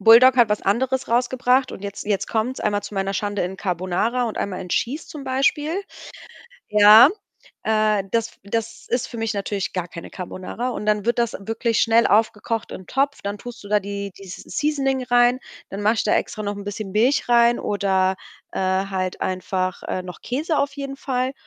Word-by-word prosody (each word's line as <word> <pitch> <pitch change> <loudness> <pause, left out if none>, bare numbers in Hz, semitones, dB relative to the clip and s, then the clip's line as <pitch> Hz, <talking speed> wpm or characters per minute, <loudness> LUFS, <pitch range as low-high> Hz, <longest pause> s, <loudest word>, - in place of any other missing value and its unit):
Buldak 235 +5 +8
hat 240 -3 +6
was 210 - +1
anderes 260 +6 0
rausgebracht, 250 +2 +2
und 190 - -9
jetzt 200 0 -6
jetzt 205 -2 -1
kommt's, 235 +4 -1
einmal 205 -1 0
zu 205 - -8
meiner 195 0 -1
Schande 205 0 -1
in 185 +2 -4
Carbonara 185 +7 -1
und 225 - -4
einmal 190 -2 -3
in 180 - -7
Cheese 265 - -1
zum 290 -3 -9
Beispiel. 275 +3 +1 1.0
Ja 210 +4 +9 0.6
äh, 215 -2 +2
das 230 0 0
das 225 +2 -4
ist 245 +1 0
für 235 - -8
mich 225 -1 -1
natürlich 200 0 -3
gar 180 -2 -2
keine 170 - -9
Carbonara. 185 +7 -5
Und 210 - -5
dann 210 -1 +1
wird 235 - +1
das 235 -1 0
wirklich 225 +2 -1
schnell 230 0 +4
aufgekocht 220 +1 +1
im 185 - -9
Topf, 275 +1 0
dann 200 +1 -4
tust 245 +1 -9
du 200 - -11
da 210 0 +4
die 200 0 -5
dieses 190 -2 -9 0.2
seasoning 275 -4 0
rein. 245 0 +4 0.3
Dann 195 - -5
mache 215 +2 +3
ich 225 - -1
da - - +3
extra 215 - -2
noch 205 0 -3
'n 200 - -7
bisschen 205 0 -5
Milch 240 +8 +2
rein 235 0 +5
oder, 190 -2 +1 0.4
äh, - - -4
halt 190 0 -1
einfach, 185 0 -2
äh, 185 - -3
noch 180 -1 -10
Käse 300 +5 -1
auf 280 - 0
jeden 275 -1 -5
Fall. 255 -1 -1
215 Hz, 195 wpm, -22 LUFS, 200-245 Hz, 1.0 s, Ja